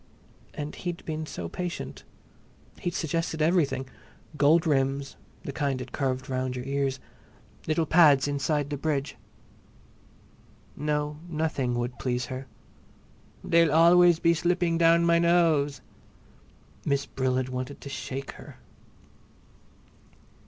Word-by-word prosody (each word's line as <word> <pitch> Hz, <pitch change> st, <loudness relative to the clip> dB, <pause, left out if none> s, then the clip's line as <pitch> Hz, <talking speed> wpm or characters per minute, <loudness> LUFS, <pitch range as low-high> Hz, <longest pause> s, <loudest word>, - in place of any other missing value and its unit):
And 150 Hz, 0 st, -5 dB
he'd 175 Hz, -1 st, -6 dB
been 155 Hz, -1 st, -4 dB
so 85 Hz, -, -5 dB
patient. 175 Hz, -, -6 dB, 0.7 s
He'd 175 Hz, -2 st, -3 dB
suggested 165 Hz, 0 st, -2 dB
everything—gold 150 Hz, 0 st, 0 dB
rims, 135 Hz, -2 st, 0 dB, 0.3 s
the -, -, -5 dB
kind 140 Hz, -2 st, -1 dB
that 125 Hz, 0 st, -7 dB
curved 130 Hz, -2 st, -2 dB
round 130 Hz, -1 st, -2 dB
your 125 Hz, 0 st, -5 dB
ears, 135 Hz, -1 st, -1 dB, 0.7 s
little 160 Hz, +1 st, +1 dB
pads 150 Hz, -5 st, +5 dB
inside 145 Hz, +1 st, -1 dB
the 145 Hz, -, -2 dB
bridge. 145 Hz, -1 st, -2 dB, 1.6 s
No, 150 Hz, 0 st, -2 dB
nothing 155 Hz, -6 st, -1 dB
would 120 Hz, +1 st, -3 dB
please 125 Hz, -1 st, -1 dB
her. 130 Hz, +1 st, -7 dB, 1.0 s
"They'll 165 Hz, -2 st, +4 dB
always 170 Hz, +2 st, +6 dB
be 170 Hz, 0 st, +3 dB
sliding 175 Hz, 0 st, +1 dB
down 170 Hz, 0 st, +5 dB
my 170 Hz, 0 st, +4 dB
nose!" 165 Hz, -5 st, +2 dB, 1.0 s
Miss 140 Hz, -1 st, 0 dB
Brill 130 Hz, -1 st, -1 dB
had 130 Hz, 0 st, -1 dB
wanted 130 Hz, +2 st, -5 dB
to 140 Hz, -, -8 dB
shake 135 Hz, 0 st, -5 dB
her. -, -, -13 dB
145 Hz, 115 wpm, -27 LUFS, 135-165 Hz, 1.6 s, always